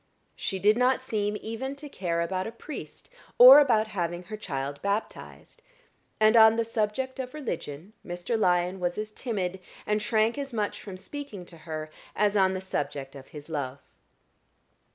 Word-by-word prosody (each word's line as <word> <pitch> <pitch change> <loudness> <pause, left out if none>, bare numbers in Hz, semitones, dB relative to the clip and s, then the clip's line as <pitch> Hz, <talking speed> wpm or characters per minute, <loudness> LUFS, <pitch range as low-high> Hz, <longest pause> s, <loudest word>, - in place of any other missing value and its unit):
She 190 - -3
did 210 +5 +3
not 255 +1 +3
seem 210 -4 -1
even 265 +5 -4
to 295 +1 -8
care 175 -9 -2
about 185 +3 -2
a - - -5
priest, 270 +5 -9 0.3
or 255 +4 +11
about 225 -6 +3
having 175 -3 -3
her 215 +4 -7
child 140 -8 -5
baptized; 200 +2 -4 0.6
and 215 +1 +5
on 220 -1 +8
the 230 0 0
subject 230 +4 -2
of 255 +2 -5
religion 175 - -6
Mr. 175 +6 -3
Lyon 180 -2 +2
was 175 -1 -1
as 215 0 -3
timid, 190 -6 -3 0.3
and 210 0 0
shrank 220 +4 +1
as 275 -2 -5
much 210 -2 -2
from 190 -3 -8
speaking 210 -2 -8
to 170 - -11
her, 155 0 -5 0.2
as 210 0 +2
on 190 -1 +3
the 185 - -3
subject 140 -7 -4
of 135 -1 -11
his 150 -1 -10
love. 140 -4 -3
210 Hz, 170 wpm, -27 LUFS, 175-230 Hz, 0.6 s, or